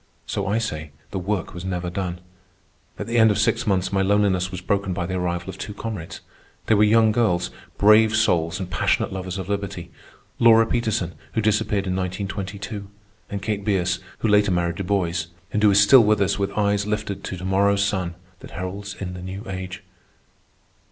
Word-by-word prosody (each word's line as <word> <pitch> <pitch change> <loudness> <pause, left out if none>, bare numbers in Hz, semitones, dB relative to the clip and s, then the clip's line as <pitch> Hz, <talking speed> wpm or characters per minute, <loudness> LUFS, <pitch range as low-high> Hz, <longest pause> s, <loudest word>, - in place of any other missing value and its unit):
So 100 -1 -3
I 105 +3 +1
say, 80 -9 -3 0.2
the 95 - -2
work 95 0 -2
was 90 - -7
never 90 -2 -3
done. 90 -1 -4 0.8
At - - -4
the 115 0 +1
end 110 0 +7
of 105 - +1
six 110 - +1
months 95 -1 +1
my 95 - +2
loneliness 95 -2 +2
was 95 -1 -6
broken 100 +1 -1
by 90 0 -2
the 95 - -4
arrival 90 -1 -2
of 95 - -13
two 105 - -6
comrades. 105 -7 -6 0.4
They - - +3
were 105 0 +5
young 110 +1 +5
girls, 105 -6 +1 0.3
brave 105 +1 +6
souls 85 -5 +2
and 95 - -4
passionate 90 +2 0
lovers 95 -1 -4
of 95 - -5
liberty: 100 -4 -4 0.5
Lora 115 -1 +7
Peterson, 110 -7 -1 0.2
who 110 - +1
disappeared 105 -1 +1
in 90 -1 -1
1922, 100 +2 -4 0.4
and 100 -1 -5
Kate 105 -1 -2
Bierce, 95 -3 +1 0.2
who - - +1
later 105 -1 +4
married 85 -1 0
Du 100 - -3
Bois, 90 -4 0 0.3
and 105 - +1
who 105 - +6
is 100 0 +5
still 115 +5 +8
with 105 0 +3
us 100 +1 +1
with 100 0 -1
eyes 100 -1 +1
lifted 105 -2 -3
to 95 - -5
to 90 - -7
morrow's 100 +1 +3
sun, 90 -4 -2 0.2
that - - -11
heralds 95 +3 -6
in 90 -2 -4
the 90 - -7
new 95 +3 -6
age. 95 -1 -6
100 Hz, 195 wpm, -23 LUFS, 90-105 Hz, 0.8 s, still